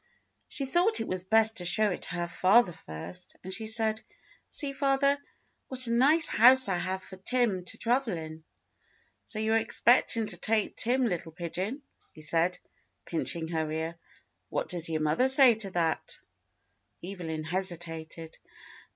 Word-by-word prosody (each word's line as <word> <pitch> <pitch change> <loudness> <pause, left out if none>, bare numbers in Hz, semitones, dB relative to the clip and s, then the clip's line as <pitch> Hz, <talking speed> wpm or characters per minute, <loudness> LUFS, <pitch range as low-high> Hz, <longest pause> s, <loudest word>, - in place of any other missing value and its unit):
She 275 - -4
thought 355 +10 +2
it - - -4
was 185 -1 -1
best 220 +2 +3
to 180 - -3
show 210 +3 +3
it 180 - -6
to 175 - -3
her 175 0 -3
father 190 +4 +3
first, 120 - -6
and 190 +1 -6
she 220 +2 -4
said, 220 -1 +1 0.5
"See, 285 -3 0
father, 275 0 +1 0.5
what 255 -1 +1
a 230 - -2
nice 290 +8 +6
house 255 +3 +6
I 190 -2 -1
have 185 +2 -3
for 190 - -12
Tim 200 -3 0
to - - -9
travel 235 -5 -1
in." 160 0 -9 0.8
"So 215 - -6
you 220 +1 -1
are 225 - +3
expecting 230 0 +3
to - - -3
take 220 -1 -1
Tim, 250 +2 +2
little 175 -6 -4
pigeon," 185 - -6 0.3
he 155 - -11
said, 170 +4 +1 0.5
pinching 165 0 -3
her 160 -2 -3
ear. 160 +1 -4 0.5
"What - - -4
does 170 -2 -2
your 155 -1 -2
mother 155 +12 +1
say 265 -2 +7
to 215 -3 -2
that.^" 170 -3 -2 0.8
Evelyn 170 -4 -6
hesitated. 165 -2 -3
190 Hz, 160 wpm, -28 LUFS, 170-240 Hz, 0.8 s, say